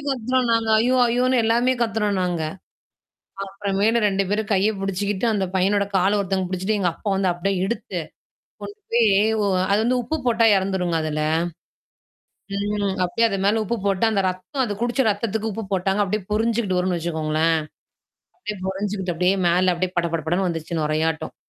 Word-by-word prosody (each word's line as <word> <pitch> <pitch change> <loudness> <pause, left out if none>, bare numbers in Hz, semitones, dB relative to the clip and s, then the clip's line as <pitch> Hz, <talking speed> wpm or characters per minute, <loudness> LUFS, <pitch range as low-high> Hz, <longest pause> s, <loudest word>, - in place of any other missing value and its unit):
கத்துறோம் 255 0 0
நாங்க. 225 -1 +1
ஐயோ! 250 +3 +2
ஐயோன்னு 250 +1 +2
எல்லாமே 240 +3 +2
கத்துறோம் 210 -3 0
நாங்க. 175 -3 -1 1.0
அப்புறமேலு 200 +3 0
2 195 0 +1
பேரும் 215 +1 -1
கைய 200 +2 +3
புடிச்சுக்கிட்டு 195 +2 -1
அந்த 195 - 0
பையனோட 200 +2 +2
கால 190 +2 +3
ஒருத்தவங்க 190 -1 -1
புடிச்சுட்டு 190 +3 -1
எங்க 180 -3 +2
அப்பா 205 - -6
வந்து 190 -1 +1
அப்டியே 180 +2 -2
எடுத்து. 235 - -4 0.6
கொண்டு 410 +1 -8
போய் 230 -1 +4 0.4
ஓ - - +1 0.3
அது 205 - +4
வந்து 250 +1 +2
உப்பு 250 +7 -2
போட்டா 230 -1 +3
இறந்துருங்க 190 -3 0
அதுல. 155 -1 -2 1.3
ம். 205 -1 -1
அப்டியியே 230 +6 +2
அது 195 - -2
மேல 215 +2 +2
உப்பு 235 +4 -2
போட்டு 195 +1 +1
அந்த 200 -3 +1
ரத்தம் 185 +10 -3
அது 220 - -3
குடிச்ச 240 +3 +1
ரத்தத்துக்கு 220 +1 -2
உப்பு 225 +2 -5
போட்டாங்க. 195 +2 +1
அப்டியியே 200 0 -2
பொறிஞ்சுக்கிட்டு 220 -3 +1
வரும்ன்னு 180 -1 0
வச்சுக்கோங்களேன். 160 -1 0 0.8
அப்டியே 210 - -6
பொறஞ்சுகிட்டு 190 -2 -3
அப்டியே 180 +3 +2
மேல 180 +1 +3
அப்டியே 180 +1 -2
பட, 170 - +1
பட, 165 - -1
படன்னு 180 +3 +1
வந்துச்சு 165 0 -4
நொறையாட்டம். 155 +1 -1
195 Hz, 160 wpm, -22 LUFS, 180-225 Hz, 1.3 s, போய்